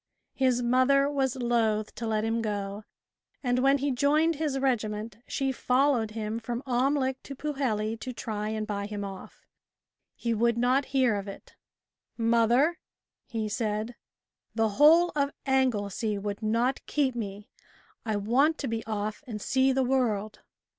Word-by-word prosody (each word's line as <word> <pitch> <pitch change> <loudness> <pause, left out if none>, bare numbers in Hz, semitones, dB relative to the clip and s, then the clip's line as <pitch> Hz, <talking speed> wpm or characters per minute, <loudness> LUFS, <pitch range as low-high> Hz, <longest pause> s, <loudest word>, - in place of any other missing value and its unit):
His 255 -2 +1
mother 255 +3 +4
was 270 -3 0
loath 230 -4 0
to 230 - -5
let 215 -1 0
him 225 +1 0
go, 205 -1 -4 0.6
and 250 -1 +1
when 275 +2 +4
he 280 +1 -1
joined 300 +5 +2
his 300 -3 -1
regiment, 220 -5 -1
she 270 -1 -1
followed 255 -2 +2
him 215 0 -4
from 235 +2 -4
Amlych 265 +1 +1
to 275 - -8
Pwlheli 235 -7 -2
to 255 - -5
try 215 -3 -4
and 215 0 -2
buy 200 -1 -3
him 205 -1 -5
off. 195 -1 -10 0.7
He 235 -1 -1
would 235 +1 +2
not 255 +3 +2
hear 260 -3 +2
of 200 0 -4
it. 195 - -10 0.6
"Mother," 235 +8 +3 0.5
he 225 -3 -3
said, 215 +1 -2 0.6
"the 225 -1 +2
whole 320 +10 +6
of 280 -1 +1 0.2
Anglesey 220 -5 0
would 205 +1 -4
not 230 +5 0
keep 280 -4 +1
me, 205 -3 -6 0.5
I 220 -2 -1
want 255 +10 +2
to 275 - -3
be 225 -1 -2
off 215 +3 -3
and 220 -3 -5
see 265 +5 +2
the 265 0 +2
world." 225 -5 0
235 Hz, 155 wpm, -28 LUFS, 215-265 Hz, 0.7 s, whole